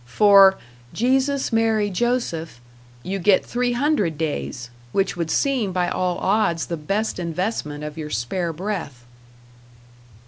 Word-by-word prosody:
For 195 - +6 0.4
"Jesus, 265 +2 +1
Mary, 220 -2 +2
Joseph," 185 - -2 0.4
you 195 +1 -3
get 190 +1 +3
three 245 0 -1
hundred 240 - 0
days 140 -5 -4 0.2
which 195 -1 0
would 170 -2 -3
seem 250 - +1
by 180 -1 0
all 180 -1 -1
odds 190 -4 +1
the 170 - -3
best 195 +7 -2
investment 170 -3 -3
of 150 +1 -7
your 150 -1 -5
spare 165 - -2
breath. 160 -8 -5
190 Hz, 130 wpm, -22 LUFS, 160-225 Hz, 0.4 s, For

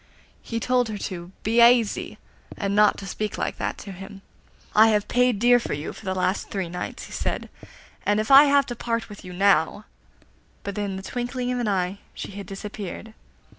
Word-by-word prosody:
He 230 - -4
told 250 0 +1
her 210 - -4
to 175 -2 -6
'be 230 +2 +3
aisy,' 235 -2 +4 0.4
and 200 0 -1
not 210 0 +4
speak 210 +1 -4
like - - -2
that - - -2
to 200 - -8
him. 195 +1 -10 0.5
'I 220 +1 +7
have 210 -2 +2
paid 250 -2 +2
dear 245 +3 +5
for - - -4
you 145 +2 -4
for - - -13
the 190 0 -1
last 185 +1 -1
three 190 -4 -3
nights,' 180 +1 -5
he - - -11
said, - - -3 0.6
'if 215 +4 +1
I 275 +2 +10
have 280 -1 +4
to 240 - -5
part 230 -1 -2
with 205 - -11
you 180 - -9
now;' 195 +1 +2 0.8
but 200 -1 -5
in 200 -2 -2
the 190 - -7
twinkling 245 +2 -3
of 250 - -1
an 240 - -1
eye 190 -1 -1 0.2
she - - -6
had 200 -1 -8
disappeared. 205 +1 -7
210 Hz, 195 wpm, -24 LUFS, 195-235 Hz, 0.8 s, I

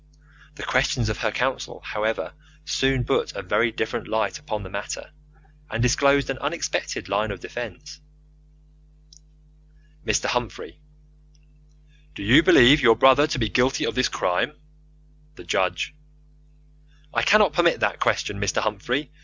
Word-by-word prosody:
The - - -8
questions 125 -3 0
of 110 - -3
her - - 0
counsel, - - -3
however, 110 +1 -3 0.3
soon 135 -5 +1
put - - -1
a - - -5
very 120 0 +1
different 110 0 -4
light 110 0 -1
upon 110 -9 -5
the 95 - -9
matter, 100 +8 -6 0.6
and 115 +1 -2
disclosed 140 +2 +3
an 130 - -6
unexpected 150 +4 -3
line 110 - -1
of 100 -3 -6
defence. 125 - -8 2.0
Mr. - - 0
Humphrey: 125 +4 -4 1.3
Do - - -7
you 115 +10 +6
believe 145 -1 +6
your 115 -3 +6
brother 135 +3 +5
to 150 - -3
be 115 -3 0
guilty 130 +4 +1
of - - -2
this 130 0 +1
crime? 90 +11 -1 0.8
The - - -12
Judge: 95 +9 -1 1.2
I - - +1
cannot 210 -6 +4
permit 170 +1 +2
that - - 0
question, 100 0 -1
Mr. 100 - 0
Humphrey. 120 +7 -2
125 Hz, 135 wpm, -23 LUFS, 110-140 Hz, 2.0 s, you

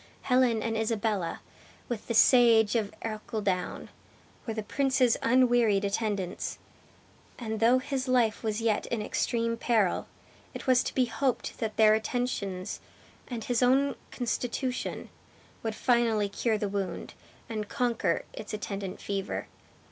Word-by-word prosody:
Helen 250 -4 +3
and 225 -1 -1
Isabella, 215 -5 -1 0.5
with 235 -4 -5
the 235 - -1
sage 230 -3 +6
of 215 -3 0
Ercildown, 210 -4 -3 0.6
were 225 - -1
the 215 - -3
prince's 260 -1 +2
unwearied 240 -5 +3
attendants; 200 -3 -2 0.8
and 220 -2 -4
though 235 +3 +5
his 265 0 -3
life 240 -4 +2
was 220 -1 -2
yet 220 -2 +1
in 235 - -2
extreme 230 +1 -1
peril, 220 -7 +1 0.5
it - - -6
was 255 -2 +5
to - - -4
be 255 - +4
hoped 255 +2 -2
that 220 -1 -3
their 215 -1 +7
attentions, 215 -5 -2 0.5
and 235 -3 -5
his 245 +1 0
own 270 +3 +4 0.2
constitution, 250 +1 -3 0.5
would 220 -1 -3
finally 230 -5 +2
cure 220 +2 0
the 210 - -2
wound, 195 -3 -4 0.3
and 215 -2 -4
conquer 240 -2 0
its 215 0 -6
attendant 200 -2 -5
fever. 195 -1 -3
225 Hz, 135 wpm, -29 LUFS, 210-245 Hz, 0.8 s, their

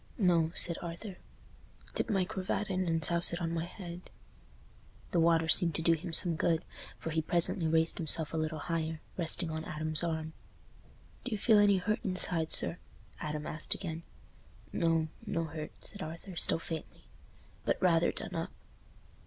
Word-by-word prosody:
"No," 170 -6 +3
said 170 - +2
Arthur, 175 +3 -7 0.8
"dip - - -1
my 195 -4 +2
cravat 195 0 -3
in 185 -1 0
and 165 -1 +4
souse 170 0 +3
it 170 - -2
on 165 -1 -2
my 165 0 -1
head." 175 -1 -9 1.0
The 175 - +2
water 165 -1 +4
seemed 165 -1 +5
to 165 - -1
do 170 - +5
him 170 +2 -4
some 170 0 +6
good, 165 +1 +1 0.3
for 165 - -5
he 160 0 +1
presently 170 +1 +3
raised 160 +1 +1
himself 160 -1 +3
a - - -1
little 155 0 -2
higher, 160 -2 -2 0.2
resting 170 -1 +1
on 160 0 -4
Adam's 155 0 0
arm. 160 -1 -2 0.9
"Do - - -4
you 215 - 0
feel 215 +1 +5
any 205 -1 +5
hurt 215 +4 0
inside 180 -4 -1
sir?" 175 - 0 0.4
Adam 150 0 -4
asked 155 - -1
again 165 -4 -5 0.7
"No—no 165 +3 -1
hurt," 155 -1 -6
said 200 - -9
Arthur, 165 +3 -7
still - - +4
faintly, 165 -1 -7 0.6
"but - - 0
rather 170 -2 +3
done - - -6
up." - - -3
165 Hz, 165 wpm, -32 LUFS, 160-180 Hz, 1.0 s, some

